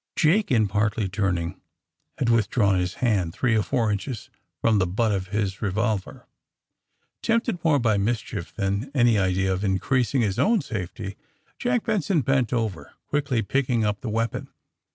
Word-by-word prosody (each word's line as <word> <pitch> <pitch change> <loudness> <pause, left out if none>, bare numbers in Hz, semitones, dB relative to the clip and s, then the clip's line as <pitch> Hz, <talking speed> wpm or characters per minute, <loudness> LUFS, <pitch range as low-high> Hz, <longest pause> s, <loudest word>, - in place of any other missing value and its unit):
Jake, 185 +7 +3
in 110 -5 +3
partly 105 +1 0
turning, 95 -2 -2 0.6
had 130 - 0
withdrawn 110 -4 +3
his 90 +1 -2
hand 95 -7 +1
three 120 -1 +2
or 110 - +3
four 110 +4 0
inches 105 +3 -4 0.3
from 110 -2 +3
the 95 - +2
butt 110 +5 +1
of 95 -2 -2
his 100 -1 -2
revolver. 105 0 -2 1.0
Tempted 230 -4 +1
more 160 -3 +4
by 115 -5 +2
mischief 105 -2 -2
than 100 +5 -2
any 120 -4 +4
idea 95 0 +1
of 95 +2 -3
increasing 120 +7 +1
his 100 -4 0
own 225 0 +3
safety. 100 - -5 0.4
Jack 245 -1 +1
Benson 195 -7 +1
bent 130 -2 +1
over, 110 -8 -2 0.2
quickly 140 -5 0
picking 125 -1 +1
up 105 -1 -1
the 120 - -4
weapon. 115 +1 -2
110 Hz, 155 wpm, -25 LUFS, 100-130 Hz, 1.0 s, more